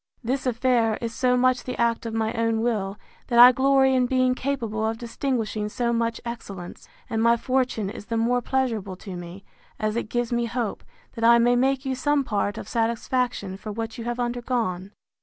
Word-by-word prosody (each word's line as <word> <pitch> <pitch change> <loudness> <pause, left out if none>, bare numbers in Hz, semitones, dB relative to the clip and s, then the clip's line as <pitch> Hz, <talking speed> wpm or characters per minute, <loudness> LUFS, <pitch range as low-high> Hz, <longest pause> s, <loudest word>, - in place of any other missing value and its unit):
—This 260 +3 -1
affair 235 -2 +2
is 230 -1 -4
so 250 0 +2
much 255 0 +2
the 255 - -6
act 235 0 +1
of 225 - -5
my 220 0 0
own 230 -1 0
will, 210 -4 -1 0.3
that 240 - 0
I 245 +1 +11
glory 265 +1 +3
in 255 -1 +3
being 255 0 +2
capable 240 -5 -2
of 220 +1 -1
distinguishing 230 -3 -2
so 235 +2 -1
much 230 0 -1
excellence; 200 -7 -8 0.2
and 225 -1 -1
my 235 +1 +4
fortune 255 -4 0
is 205 +1 -8
the 230 - -1
more 245 +2 +2
pleasurable 230 -7 -1
to 190 0 -8
me, 175 +2 -9 0.3
as 215 0 -1
it 235 -2 -3
gives 240 0 -1
me 240 0 +1
hope, 235 -2 -3 0.3
that 230 - -6
I 235 +1 +7
may 240 +1 +4
make 265 +2 +1
you 265 - -1
some 285 +2 +1
part 205 -3 -1
of - - -7
satisfaction 230 -3 -1
for 215 +2 -7
what 225 +2 -5
you - - -4
have 240 +1 -3
undergone. 240 -6 -2
235 Hz, 195 wpm, -25 LUFS, 220-250 Hz, 0.3 s, I